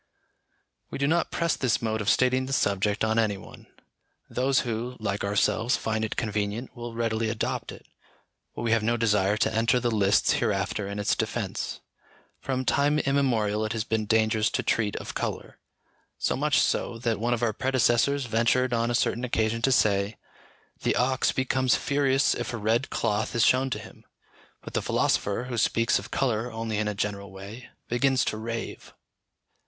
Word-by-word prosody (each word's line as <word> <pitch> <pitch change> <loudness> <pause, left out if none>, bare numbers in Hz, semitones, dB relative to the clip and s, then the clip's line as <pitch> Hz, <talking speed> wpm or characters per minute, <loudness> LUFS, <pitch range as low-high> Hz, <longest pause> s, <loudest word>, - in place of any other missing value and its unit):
We - - -5
do 140 - 0
not 165 +4 +1
press 170 -1 0
this 125 -4 +1
mode 110 -1 -2
of 105 - 0
stating 130 +3 +2
the 135 - -3
subject 100 -2 +1
on 110 +1 +2
any 105 -3 +1
one. - - -13 0.6
Those 130 +1 +2
who, 120 +1 -4
like 100 -2 -2
ourselves, 105 +4 +1
find 110 0 -2
it 110 - -3
convenient, 105 +2 -3
will 120 -1 -7
readily 115 -1 0
adopt 110 -1 -3
it; - - -12 0.7
but - - -5
we 115 - 0
have 115 -1 +3
no 115 +2 +1
desire 105 -3 +2
to 110 0 +1
enter 115 +3 +3
the 120 -1 0
lists 100 -2 +3
hereafter 100 -2 -1
in 100 +1 -5
its 105 - +1
defence. - - -3 0.6
From 130 -1 -2
time 145 +3 +2
immemorial 120 -8 +1
it 110 +1 -2
has 110 -2 -1
been 110 -2 -2
dangerous 110 0 +2
to - - -2
treat 105 -3 0
of - - -6
colour; - - -4 0.6
so - - 0
much - - +2
so, 115 - 0
that 115 -2 -1
one 120 +2 +1
of 120 - -5
our 115 -2 +1
predecessors 130 +2 +2
ventured 120 +2 +1
on 115 0 +1
a 120 - 0
certain 120 +1 0
occasion 115 -2 0
to 135 - +2
say, 100 -3 +2 0.6
"The - - +1
ox 130 +1 +2
becomes 130 -2 +1
furious 140 -1 +2
if 120 0 -4
a - - -2
red 115 +5 0
cloth 110 +2 -1
is 115 - +4
shown 130 +1 +3
to - - -2
him; - - -13 0.6
but - - -9
the - - 0
philosopher, 100 +4 0
who 125 -2 -3
speaks 115 +1 +2
of - - -10
colour 120 -2 -1
only 115 -1 -3
in 110 - 0
a 105 - -2
general 100 -1 -3
way, 105 +5 -10 0.2
begins 130 +2 +2
to 110 - -2
rave." 115 +1 -6
115 Hz, 180 wpm, -26 LUFS, 110-125 Hz, 0.7 s, is